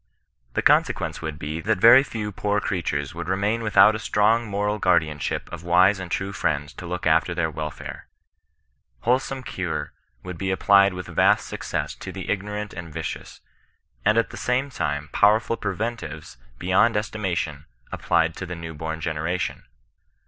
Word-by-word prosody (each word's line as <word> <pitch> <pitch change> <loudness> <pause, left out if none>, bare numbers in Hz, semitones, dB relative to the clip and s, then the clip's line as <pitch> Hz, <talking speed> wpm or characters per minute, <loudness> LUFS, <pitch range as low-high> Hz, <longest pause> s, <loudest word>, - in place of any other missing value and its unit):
The - - 0
consequ^ice - - +2
would 80 -2 -5
be, 80 +1 -4
that 110 +2 +1
very 115 +6 +8
few 110 -6 -4
poor 105 +1 0
creatures 70 -8 -2
would 85 - -6
remain 100 +4 0
without 110 -1 +6
a 110 - -3
strong 110 +2 +2
moral 105 +1 -1
guardianship 80 -6 +1
of 85 -1 -7
wise 90 +3 +4
and 95 -2 -6
true 95 +2 -2
friends 75 -5 -1
to 90 - -7
look 90 +1 -4
after 80 +2 +3
their 80 -2 0
welfare. 75 0 -7 0.9
Wholesome 130 +2 0
<;ure - - -3 0.3
would 90 -2 -7
be 95 -1 -1
ap 95 - 0
plied 100 -1 +5
with 90 - -6
vast - - +3
success - - -4
to - - -8
the - - -4
ignorant 105 +1 -3
and 85 -2 -8
vicious, - - -6 0.6
and 110 +2 +3
at 115 - +1
the - - -8
same 130 +3 0
time 75 - -3
powerful 110 +3 +3
preventives 100 - -5 0.2
beyond 95 - +3
estknatioii 90 -8 -2 0.3
applied 80 +1 +1
to 90 - -5
the 90 - -5
new 85 -1 -7
born 80 +1 -5
gena:ation. 80 +3 -2
95 Hz, 165 wpm, -24 LUFS, 80-105 Hz, 0.9 s, very